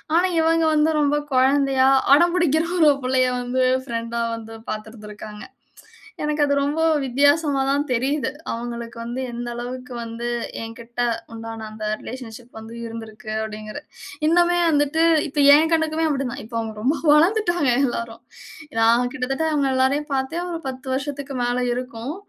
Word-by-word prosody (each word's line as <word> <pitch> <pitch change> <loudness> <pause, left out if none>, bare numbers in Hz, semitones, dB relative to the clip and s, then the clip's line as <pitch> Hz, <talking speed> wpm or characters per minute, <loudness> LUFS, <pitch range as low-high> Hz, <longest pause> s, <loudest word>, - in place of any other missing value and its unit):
ஆனா, 360 +2 +4
இவங்க 330 0 +3
வந்து 305 +1 +3
ரொம்ப 290 0 +2 0.2
கொழந்தையா, 265 0 +3 0.3
அடம்பிடிக்குற 340 -1 +3 0.2
ஒரு 285 -1 +5
புள்ளைய 255 0 +2
வந்து, 255 +1 0 0.2
பிரெண்டா 230 0 -3
வந்து 225 0 -9 0.2
பாத்துருந்திருக்காங்க. 215 -1 -8 0.8
எனக்கு 300 0 +1
அது 285 - +1
ரொம்ப 295 +3 0 0.2
வித்தியாசமா 285 +2 +2
தான் 285 +1 +2
தெரியுது. 265 +4 0 0.2
அவங்களுக்கு 235 0 -6
வந்து 240 +3 -4
எந்த 240 0 -5
அளவுக்கு 250 +1 -6
வந்து, 230 +1 -5 0.4
என்கிட்ட 235 +1 -7 0.3
உண்டான 225 -1 -7
அந்த 215 0 -6 0.2
ரிலேஷன்ஷிப் 245 -1 -9
வந்து 225 +1 -10
இருந்துருக்கு, 225 -1 -9 0.2
அப்டீன்குறது. 215 +6 -8 0.4
இன்னுமே 350 +1 +3
வந்துட்டு 290 +2 +2 0.3
இப்ப 290 +1 -4 0.2
என் 320 +2 +3
கண்ணுக்குமே 320 0 +1
அப்படி 275 -3 -1
தான் - - -7
இப்போ 230 +1 -9
அவுங்க 220 -1 -4
ரொம்ப 275 +7 +1 0.2
வளர்ந்துவிட்டாங்க 345 - +3 0.2
எல்லாரும். 230 -1 -5 0.6
நான் 235 +2 +3
கிட்டத்தட்ட 270 +5 -2
அவுங்க 280 -2 +1
எல்லாரையும் 280 +3 +1
பாத்தே 270 +6 -1
ஒரு 330 - -4
10 260 0 -9
வருஷத்துக்கு 280 0 -5
மேல 245 +1 0 0.2
இருக்கும். 250 +3 -5
260 Hz, 140 wpm, -22 LUFS, 230-295 Hz, 0.8 s, ஒரு